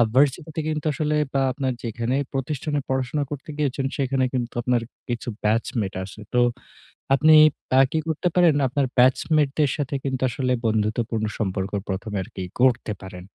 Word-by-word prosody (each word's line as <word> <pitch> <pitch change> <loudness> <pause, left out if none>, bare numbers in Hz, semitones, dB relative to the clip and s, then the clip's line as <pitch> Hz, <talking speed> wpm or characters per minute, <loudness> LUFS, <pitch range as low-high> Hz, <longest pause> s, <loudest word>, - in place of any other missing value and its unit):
ভারসিটিতে 145 +3 +2
কিন্তু 155 0 -3
আসলে 150 0 0 0.2
আ - - +2
আপনার 130 -2 -2
যেখানে 115 +2 -2 0.2
প্রতিষ্ঠানে 145 +2 -2
পড়াশোনা 130 +2 0
করতে 145 +1 -7
গিয়েছেন 140 -2 -1
সেখানে 135 -1 +1
কিন্তু 120 -2 -2
আপনার 125 -1 +1 0.3
কিছু 120 0 -3
ব্যাচমেট 110 -1 0
আছে। 95 +3 -10
তো 125 - +3 0.8
আপনি 155 +3 +5 0.5
আ - - +9
কী 160 - +1
করতে 160 +3 0
পারেন 175 -4 +5
আপনার 140 +2 0
ব্যাচমেট 140 +3 +4
দের 145 -3 +3
সাথে 140 0 -2
কিন্তু 130 -1 -2
আসলে 130 -2 -1
বন্ধুত্বপূর্ণ 110 +1 0
সম্পর্ক 95 -2 -2 0.2
প্রথমে 100 +2 -3
আরকি 95 +1 -8 0.2
গড়তে 125 -4 +3
পারেন। 90 -1 -9
130 Hz, 150 wpm, -24 LUFS, 115-145 Hz, 0.8 s, আ